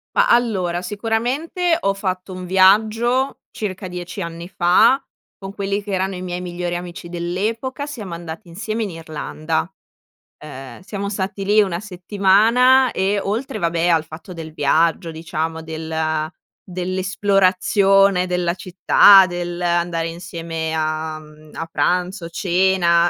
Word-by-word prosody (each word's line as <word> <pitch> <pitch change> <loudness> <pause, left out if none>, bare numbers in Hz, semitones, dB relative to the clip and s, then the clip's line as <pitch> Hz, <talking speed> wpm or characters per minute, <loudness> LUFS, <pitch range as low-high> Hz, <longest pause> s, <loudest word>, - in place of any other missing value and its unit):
Ma - - +4
allora, 185 -7 +1
sicuramente 245 - -1
ho 195 0 0
fatto 185 -1 -4
un 185 0 -7
viaggio, 220 +8 +3
circa 195 -2 -5
10 180 +2 -6
anni 170 0 -6
fa 195 +9 +4 0.4
con 195 0 -8
quelli 200 0 -2
che 205 - -11
erano 190 0 -1
i 180 - -6
miei 180 -1 -4
migliori 175 -1 -4
amici 175 +1 -7
dell'epoca. 220 - -3
Siamo 215 -11 -7
andati 170 +3 -8
insieme 215 +6 -4
in 200 - -4
Irlanda. 160 0 -3 0.8
Uhm, 135 -2 -9
siamo 200 +1 -5
stati 195 0 -3
lì 210 +1 +5
1 185 -4 -1
settimana 215 +7 +3
e 195 +2 0
oltre, 230 +4 -3
vabbè, 170 -2 0
al 165 -2 +3
fatto 160 +3 -10
del 160 -2 -8
viaggio 165 +3 +1
diciamo 160 0 -4
del 160 -1 -2 0.4
dell'esplorazione 190 +1 +2
della 180 -1 0
città, 190 +2 +6
dell'andare 175 -1 -1
insieme 165 -2 -5
a, 155 0 -2
mhmm, 155 0 -16
a 165 - -4
pranzo, 180 0 0
cena, 175 -1 +2
180 Hz, 130 wpm, -20 LUFS, 170-200 Hz, 0.8 s, città